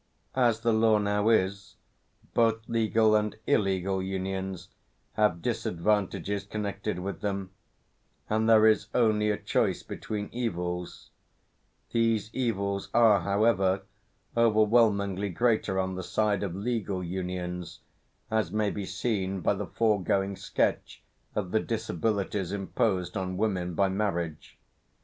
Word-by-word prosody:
As 120 -4 +2
the 115 0 +2
law 110 0 +4
now 105 +1 +1
is, 100 -2 +1 0.6
both 115 -1 +2
legal 110 -1 +3
and 105 0 0
illegal 95 -2 +1
unions 95 -1 -4 0.4
have 105 -6 +1
disadvantages 100 +3 -1
connected 100 -1 -4
with 95 +2 -5
them, 100 -2 -3 0.8
and 110 +1 +1
there 110 -1 +7
is 110 -2 +4
only 110 -3 +3
a 105 - +1
choice - - 0
between 105 -1 -5
evils; 90 -7 -4 0.8
these 115 -2 +1
evils 100 -6 -1
are 115 -4 +6
however, 100 -1 +2 0.5
overwhelmingly 105 -3 +3
greater 110 0 +1
on 95 0 -1
the 95 - -4
side 105 +2 0
of 95 -4 -3
legal 100 -3 -2
unions 90 -1 -5 0.5
as 110 -1 +1
may 105 -1 0
be 100 -2 -5
seen 95 -1 -2
by - - +2
the 100 -1 -4
foregoing 100 -1 +1
sketch - - -1 0.3
of 95 -4 -2
the 110 - +3
disabilities 100 -3 -2
imposed 95 -2 -1
on 95 -1 -3
women 90 -5 -1
by 100 +4 +3
marriage. 90 -5 -3
100 Hz, 120 wpm, -28 LUFS, 95-110 Hz, 0.8 s, there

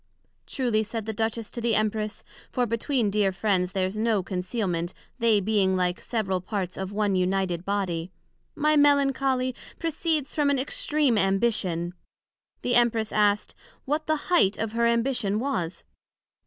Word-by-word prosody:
Truly, 240 -5 0
said 220 0 -4
the 220 - -3
Duchess 220 0 -2
to 235 - -5
the 230 -1 +2
Empress, 215 0 -1 0.3
(for 250 - +1
between 230 -1 0
dear 200 -1 +2
friends 185 -2 0
there's 190 +1 -1
no 220 -3 +1
concealment, 180 -2 -2 0.2
they 225 -3 +4
being 200 -2 +2
like 180 -1 0
several 195 -6 -1
parts 185 -1 -3
of 190 0 -4
one 205 -1 0
united 185 -1 0
body) 185 -4 -2 0.4
my 305 0 +2
Melancholy 275 -3 +3 0.2
proceeds 315 -3 -1
from 295 -2 +2
an 280 - +2
extream 275 -2 +1
Ambition. 195 -4 0 0.7
The 245 - +1
Empress 230 -2 +3
asked, 210 -1 +2 0.3
What 300 +3 -1
the 310 - +3 0.2
height 210 - +4
of 225 -1 -2
her 235 +1 +2
ambition 235 -3 +1
was? 185 -10 -3
215 Hz, 145 wpm, -26 LUFS, 190-245 Hz, 0.7 s, they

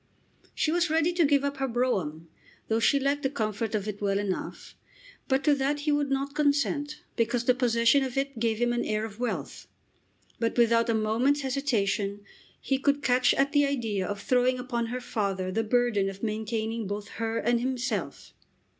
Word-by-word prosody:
She 310 - +1
was 345 0 +1
ready 325 +2 +2
to 340 -2 +3
give 280 -1 +3
up 280 0 -2
her 270 0 -1
brougham, 190 - -1 0.4
though 220 0 +2
she 280 +5 +3
liked 280 +1 0
the 270 - 0
comfort 220 -3 -2
of 205 -1 -2
it 210 -1 -5
well 195 -1 +1
enough; 200 -2 -4 0.5
but 265 +1 +1
to 295 - +4
that 285 +1 0
he 300 +1 0
would 290 -1 +1
not 275 +1 -1
consent 290 0 0
because 235 +1 0
the 250 - +5
possession 240 +1 +3
of 260 -1 -4
it 275 -3 -2
gave 225 -1 +1
him 240 +1 +1
an 240 - 0
air 215 +1 -1
of 215 0 -10
wealth; 245 - -4 0.7
but 230 +1 -1
without 230 0 +4
a 230 - +2
moment's 230 +7 +1
hesitation 215 -7 -1 0.4
he 270 -1 -1
could 285 +1 +1
catch 250 0 +3
at 275 +1 +2
the 290 -1 +3
idea 225 -9 -1
of 205 0 -4
throwing 250 +3 +2
upon 240 -2 -2
her 250 +2 -4
father 195 -5 -2
the 225 - 0
burden 220 -3 +1
of 195 +2 -10
maintaining 220 0 -2
both 205 +1 -4
her 225 0 -1
and 240 +1 +1
himself! 255 +1 -3
240 Hz, 190 wpm, -27 LUFS, 220-275 Hz, 0.7 s, the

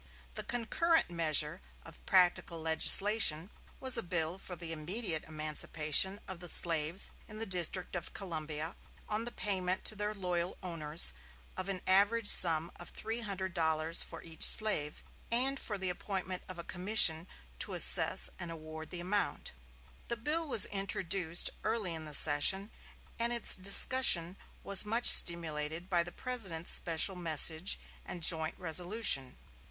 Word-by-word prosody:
The - - -8
concurrent 315 - -3
measure 160 0 -1 0.2
of 165 - -14
practical 180 -2 -1
legislation 165 +2 +5 0.3
was 260 -1 +5
a - - -2
bill 175 0 -6
for 180 - -11
the 170 -2 -7
immediate 165 +1 -5
emancipation 155 +4 -1
of 190 -3 -10
the 175 -1 -10
slaves 165 +2 +2 0.2
in 215 - -13
the 225 - -7
District 180 -1 -4
of 175 - -8
Columbia, 160 -3 -8 0.3
on 215 +2 -6
the 240 - -7
payment 185 -4 -5
to 215 - +2
their 210 +1 -7
loyal 180 -2 -6
owners 160 - +2 0.4
of 185 +1 -9
an 185 -2 -7
average 205 +4 0
sum 165 -4 +5
of 175 - -12
three 225 +2 -8
hundred 190 -3 -7
dollars 160 -1 -2
for - - -6
each 165 -1 -16
slave, 200 -9 +1 0.3
and 265 +4 0
for 210 - -6
the 190 -1 -5
appointment 185 0 -8
of 185 - -11
a 170 - -10
commission 180 -3 +1 0.3
to - - -6
assess - - +3
and 175 - -7
award 160 -1 -12
the 175 - -7
amount. 200 +3 -5 0.6
The 235 - -6
bill 310 +7 -3
was 240 -7 +6
introduced 185 -3 -2
early 215 -5 -5
in 160 -1 -9
the 150 -1 -6
session, 175 +9 +4 0.5
and 235 +1 -4
its 235 -1 +2
discussion 190 -2 +4 0.3
was 200 -1 +6
much 225 +3 -5
stimulated 165 +1 +3
by 175 -1 0
the 175 +1 -9
President's 195 -11 -5
special 170 +3 -2
message 165 +1 +4 0.2
and 175 -2 -10
joint 160 -1 0
resolution. 175 - 0
180 Hz, 150 wpm, -29 LUFS, 160-205 Hz, 0.6 s, was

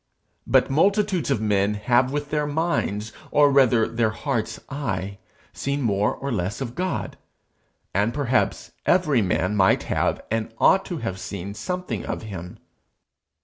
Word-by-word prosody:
But - - +3
multitudes 195 - +2
of 110 - +1
men 105 -1 +1
have 120 +4 +2
with 145 0 -3
their 150 -1 0
mind's, 145 -9 -1 0.2
or 145 0 +5
rather 125 -5 +4
their 115 -1 +1
heart's 115 0 -3
eye, 100 -9 -4 0.3
seen 140 0 -2
more 105 -2 +1
or 140 0 -4
less 95 -1 -2
of 125 -3 -4
God; 185 +4 -3 0.8
and 105 +4 +2
perhaps 130 -2 0 0.2
every 155 -9 +3
man 90 +1 0
might 95 -2 +4
have - - 0
and 115 0 -1
ought 195 - +4
to 175 - -4
have 115 -9 -4
seen 100 0 -6
something 180 - -4
of - - -4
him. 90 -5 -7
120 Hz, 145 wpm, -24 LUFS, 105-145 Hz, 0.8 s, or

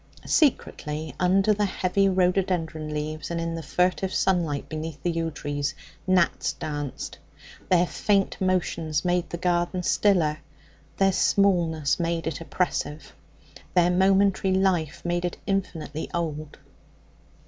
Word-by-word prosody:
Secretly, 155 - 0
under 190 +3 +3
the 205 0 +1
heavy 195 0 +1
rhododendron 180 -4 0
leaves 150 +1 -4
and 170 0 -2
in 165 0 -2
the 165 - -4
furtive 180 +4 0
sunlight 170 -7 0
beneath 155 -1 -5
the 175 - +1
yew 165 0 -1
trees, 145 -1 -3 0.3
gnats 180 -3 +2
danced. 145 -3 -5 0.5
Their 180 -1 +4
faint 195 +2 +1
motions 170 -4 0
made 180 0 +1
the 170 - -4
garden 175 +1 0
stiller; 170 -7 +2 0.6
their 195 0 +4
smallness 170 -8 +2
made 170 -1 -1
it 160 0 -3
oppressive; 165 -3 -2 0.6
their 175 0 +5
momentary 190 +1 +3
life 175 -5 0
made 175 0 0
it 175 - -2
infinitely 165 -6 -3
old. 155 -3 -3
175 Hz, 125 wpm, -25 LUFS, 155-185 Hz, 0.6 s, their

